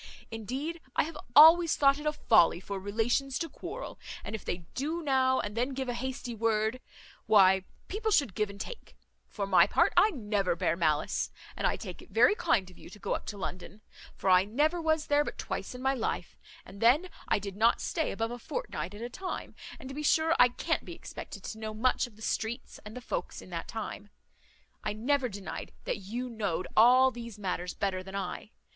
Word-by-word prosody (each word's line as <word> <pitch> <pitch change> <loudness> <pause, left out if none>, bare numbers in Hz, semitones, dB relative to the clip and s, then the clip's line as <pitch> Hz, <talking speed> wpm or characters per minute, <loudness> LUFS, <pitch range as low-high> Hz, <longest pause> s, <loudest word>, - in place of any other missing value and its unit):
Indeed 265 +10 -4
I - - +4
have 320 +2 -7 0.2
always 325 +3 +8
thought 275 0 +4
it 300 - -4
a - - +3
folly 220 - +4
for 195 +1 -5
relations 230 +7 0
to 330 - -2
quarrel; 370 - -8 0.2
and - - -6
if 220 - -5
they 175 -1 -4
do 315 +6 -2
now 260 -2 +3
and 205 0 -4
then 250 +3 -1
give 265 -1 -3
a 245 - -1
hasty 250 0 -4
word, 225 +2 0 0.5
why, 190 -2 +6 0.2
people 435 +3 -2
should 280 - +3
give 210 +1 0
and 200 0 -10
take; - - -8 0.3
for 200 - -4
my 195 -1 +5
part, - - +3
I 430 - +6
never 210 - -1
bear 165 - +1
malice; 155 -3 0 0.3
and - - +1
I - - +1
take - - -8
it - - -16
very - - +5
kind 235 - +1
of 180 - -18
you - - -12
to 200 - -12
go 205 - -2
up - - -4
to 205 - -5
London; 190 +2 -6 0.3
for 190 - +1
I 185 0 +7
never 300 - +1
was 315 -1 +1
there 290 0 +3
but - - -6
twice - - -4
in 250 - -8
my 265 0 +3
life, 250 - -3 0.3
and 200 - -12
then 265 +10 +5 0.2
I - - +3
did 200 -1 -6
not 225 +3 +3
stay 320 - -1
above 225 +1 -2
a 245 - -6
fortnight 360 - -5
at 215 - -7
a - - -2
time, 370 +9 -5 0.2
and 260 - -10
to 270 - -7
be 295 - -4
sure 320 +2 +3
I 245 - +9
can't 245 - -2
be - - -8
expected 200 - -9
to 220 - -6
know 215 -1 -5
much 250 +3 +1
of 230 - -18
the 220 - -12
streets 230 +4 -3
and 210 +3 -9
the - - -6
folks - - -4
in - - -12
that - - -4
time. - - -6 0.7
I 210 - -1
never 255 +4 +1
denied 200 -2 -7
that - - -2
you 230 +6 -5
know'd 200 -7 -2
all 255 +4 +7
these 235 -3 -8
matters 180 -3 -3
better 190 -2 -1
than 190 +1 -9
I. 195 +1 -4
235 Hz, 215 wpm, -30 LUFS, 200-280 Hz, 0.7 s, I